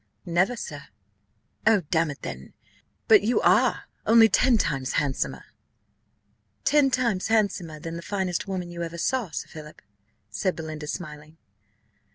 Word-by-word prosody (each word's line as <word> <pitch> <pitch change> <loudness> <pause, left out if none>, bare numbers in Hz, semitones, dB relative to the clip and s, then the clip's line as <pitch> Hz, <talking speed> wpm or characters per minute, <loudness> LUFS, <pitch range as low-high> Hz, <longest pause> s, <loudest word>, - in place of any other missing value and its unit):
"Never, 180 +7 +1
sir." 145 -10 -7 0.8
"Oh, 220 -3 +5
damn 165 -2 +2
it 145 - -8
then, 65 +2 -7 0.5
but 215 -2 +7
you 225 +4 +1
are; - - +3 0.2
only 225 0 +7
ten 240 +4 +4
times 135 -9 -1
handsomer." 140 -2 -1 1.2
"Ten 290 -2 +4
times 235 -7 0
handsomer 195 -8 0
than 165 +2 -6
the - - -6
finest 190 -1 -2
woman 180 -3 -4
you 170 0 -6
ever 170 0 -5
saw, 245 +3 -1
Sir 150 - -5
Philip?" 155 -1 -11 0.5
said 140 - -1
Belinda, 155 -2 -6
smiling. 155 -1 -7
175 Hz, 140 wpm, -25 LUFS, 155-215 Hz, 1.2 s, but